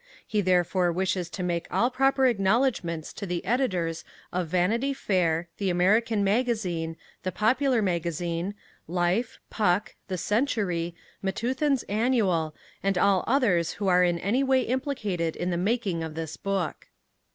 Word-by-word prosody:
He 210 - 0
therefore 180 -1 +2
wishes 185 -1 -1
to 185 - -5
make 170 -1 -1
all 240 +2 +2
proper 270 +1 +3
acknowledgments 195 - +1
to 200 - -6
the 175 0 -3
editors 180 -9 0 0.3
of 180 -1 -1
Vanity 220 - +1
Fair, 175 -6 +1
The 195 -2 0
American 205 +5 +2
Magazine, 195 -7 0 0.2
The 185 - -2
Popular 245 +3 +2
Magazine, 170 +1 -2 0.3
Life, 180 +7 0
Puck, 205 0 +1
The 185 - -3
Century, 190 - 0 0.3
Methuen's 255 +7 0
Annual, 205 -8 +1 0.3
and 195 -1 +1
all 190 0 +3
others 205 - +2
who 205 - -3
are 180 0 +5
in 175 -1 +2
any 215 +10 +1
way 265 -1 +3
implicated 210 - -2
in 180 +1 -2
the - - 0
making 195 -1 0
of 160 -1 -6
this 160 -1 -4
book. 195 -4 -3
190 Hz, 140 wpm, -27 LUFS, 175-230 Hz, 0.3 s, are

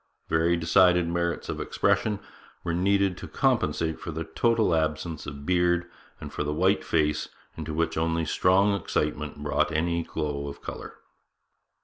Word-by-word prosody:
Very 85 +2 +2
decided 90 +1 +4
merits 85 0 -1
of - - -4
expression 105 -2 +1 0.4
were 85 - -1
needed 95 +1 +2
to - - -7
compensate 80 - 0
for - - -7
the 80 0 -3
total 110 +4 +1
absence 80 0 -1
of 70 0 -7
beard 85 0 +2 0.3
and - - -8
for - - -2
the 75 0 -2
white 95 +5 +2
face, 75 -1 0 0.3
into 80 -1 -5
which 80 +1 0
only 80 0 0
strong 95 +6 +3
excitement 75 -6 -2
brought 75 - +1
any 85 +2 0
glow 75 -3 -3
of 70 - -7
colour. - - -7
85 Hz, 150 wpm, -27 LUFS, 75-90 Hz, 0.4 s, decided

